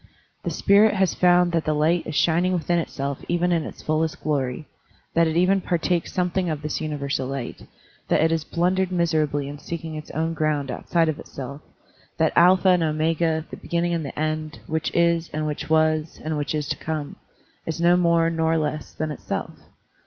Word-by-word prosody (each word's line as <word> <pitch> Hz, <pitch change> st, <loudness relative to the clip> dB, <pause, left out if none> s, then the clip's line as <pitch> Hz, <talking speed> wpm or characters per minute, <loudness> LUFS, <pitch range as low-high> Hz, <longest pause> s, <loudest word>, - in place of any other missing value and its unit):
The -, -, -1 dB
spirit 205 Hz, +1 st, +4 dB
has 190 Hz, -3 st, +2 dB
found 180 Hz, -1 st, +4 dB
that 165 Hz, -2 st, +1 dB
the 155 Hz, -, +1 dB
light 160 Hz, +3 st, +1 dB
is 155 Hz, -, -4 dB
shining 175 Hz, +4 st, +2 dB
within 175 Hz, 0 st, +1 dB
itself 140 Hz, -4 st, -3 dB
even 175 Hz, +1 st, +1 dB
in 165 Hz, -2 st, +2 dB
its -, -, -9 dB
fullest 155 Hz, +1 st, -1 dB
glory, 145 Hz, -1 st, -1 dB, 0.5 s
that 165 Hz, 0 st, +4 dB
it 160 Hz, +1 st, -1 dB
even 190 Hz, +2 st, +3 dB
partakes 175 Hz, 0 st, 0 dB
something 180 Hz, 0 st, 0 dB
of 155 Hz, -1 st, -3 dB
this 150 Hz, +1 st, -3 dB
universal 140 Hz, -3 st, -2 dB
light, 135 Hz, -2 st, -6 dB, 0.4 s
that -, -, +2 dB
it 165 Hz, -1 st, 0 dB
blundered 185 Hz, +2 st, +1 dB
miserably 155 Hz, -5 st, +1 dB
in 145 Hz, +1 st, -7 dB
seeking 165 Hz, 0 st, -6 dB
its 155 Hz, -1 st, -7 dB
own 160 Hz, +2 st, -1 dB
ground 150 Hz, -4 st, -1 dB
outside 165 Hz, +6 st, 0 dB
of 155 Hz, -1 st, -2 dB
itself, 140 Hz, +2 st, -8 dB, 0.6 s
that 160 Hz, -1 st, +2 dB
Alpha 185 Hz, +2 st, +6 dB
and 180 Hz, -1 st, +4 dB
Omega, 160 Hz, 0 st, 0 dB
the -, -, -7 dB
beginning 170 Hz, 0 st, -1 dB
and 165 Hz, -2 st, -1 dB
the 140 Hz, -, -6 dB
end, 155 Hz, 0 st, -2 dB
which 160 Hz, 0 st, -1 dB
is, 170 Hz, -1 st, +2 dB
and 155 Hz, 0 st, -2 dB
which 150 Hz, 0 st, -4 dB
was, 155 Hz, 0 st, +2 dB
and 155 Hz, 0 st, -2 dB
which 145 Hz, 0 st, -2 dB
is 150 Hz, -1 st, -2 dB
to -, -, 0 dB
come,*' 155 Hz, -2 st, -4 dB, 0.5 s
is 165 Hz, +1 st, -3 dB
no 175 Hz, +1 st, +5 dB
more 170 Hz, -2 st, +3 dB
nor 160 Hz, 0 st, +1 dB
less 150 Hz, -1 st, -3 dB
than 155 Hz, -1 st, -3 dB
itself. 150 Hz, -, -4 dB
160 Hz, 190 wpm, -24 LUFS, 155-170 Hz, 0.6 s, Alpha